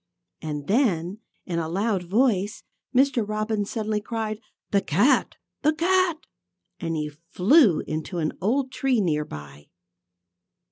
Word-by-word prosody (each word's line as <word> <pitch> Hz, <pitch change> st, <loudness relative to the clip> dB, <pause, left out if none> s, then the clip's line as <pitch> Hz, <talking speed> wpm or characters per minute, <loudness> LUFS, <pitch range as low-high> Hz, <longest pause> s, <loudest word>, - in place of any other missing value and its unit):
And 150 Hz, -2 st, -4 dB
then, 195 Hz, -, +1 dB, 0.3 s
in 170 Hz, -2 st, -2 dB
a 160 Hz, -1 st, -3 dB
loud 200 Hz, +2 st, 0 dB
voice, 210 Hz, -2 st, +1 dB, 0.3 s
Mr. 260 Hz, -2 st, +3 dB
Robin 215 Hz, 0 st, -1 dB
suddenly 215 Hz, 0 st, -2 dB
cried: 220 Hz, -1 st, -3 dB, 0.3 s
"The 200 Hz, -, +3 dB
cat! 200 Hz, -, +2 dB, 0.3 s
The 305 Hz, +1 st, +3 dB
cat!" 360 Hz, +1 st, +2 dB, 0.6 s
And 165 Hz, -1 st, -2 dB
he 150 Hz, -1 st, -2 dB, 0.2 s
flew 210 Hz, -, +5 dB
into 155 Hz, +3 st, -4 dB
an 155 Hz, -2 st, -1 dB
old 255 Hz, +7 st, +1 dB
tree 260 Hz, -2 st, +1 dB
near 150 Hz, -6 st, +1 dB
by. 75 Hz, -, -10 dB
210 Hz, 130 wpm, -25 LUFS, 165-250 Hz, 0.6 s, flew